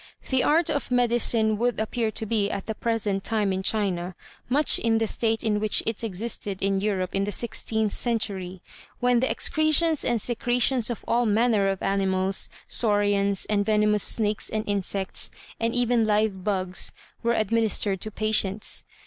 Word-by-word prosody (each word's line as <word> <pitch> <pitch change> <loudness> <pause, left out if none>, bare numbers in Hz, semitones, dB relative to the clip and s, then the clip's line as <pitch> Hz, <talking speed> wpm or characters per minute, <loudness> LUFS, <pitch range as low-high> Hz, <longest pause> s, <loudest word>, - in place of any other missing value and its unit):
The 260 -1 +2
art 320 +1 +2
of 285 -4 -3
medicine 235 -3 +2
would 240 -1 0
appear 220 +1 -1
to 220 - -4
be 210 -2 0
at 195 - -4
the 220 - -3
present 215 -4 -2
time 210 -4 0
in 190 - -2
China 190 -4 -1 0.3
much 290 +4 +4
in 225 -1 +1
the 225 - +1
state 225 +1 0
in 210 -2 0
which 215 0 +2
it 225 0 -1
existed 205 -1 -2
in 195 0 0
Europe 190 -3 -2
in 195 0 0
the 205 - -3
sixteenth 220 -1 -1
century, 195 -6 -2 0.4
when 245 -1 +3
the 260 - 0
excretions 310 0 +2
and 240 -1 0
secretions 240 +1 +1
of 240 - -6
all 240 0 +1
manner 215 -2 +2
of 195 -1 -3
animals, 190 -1 0 0.2
saurians, 205 -3 +1
and 205 -1 0
venomous 210 0 +2
snakes 215 -2 +1
and 215 0 -3
insects, 195 -1 -2 0.3
and 230 +1 -1
even 245 -1 +2
live 210 -3 0
bugs, 185 -2 -1 0.3
were 235 0 +1
administered 215 -3 0
to 215 - -3
patients. 215 -1 -1
215 Hz, 165 wpm, -25 LUFS, 200-235 Hz, 0.4 s, much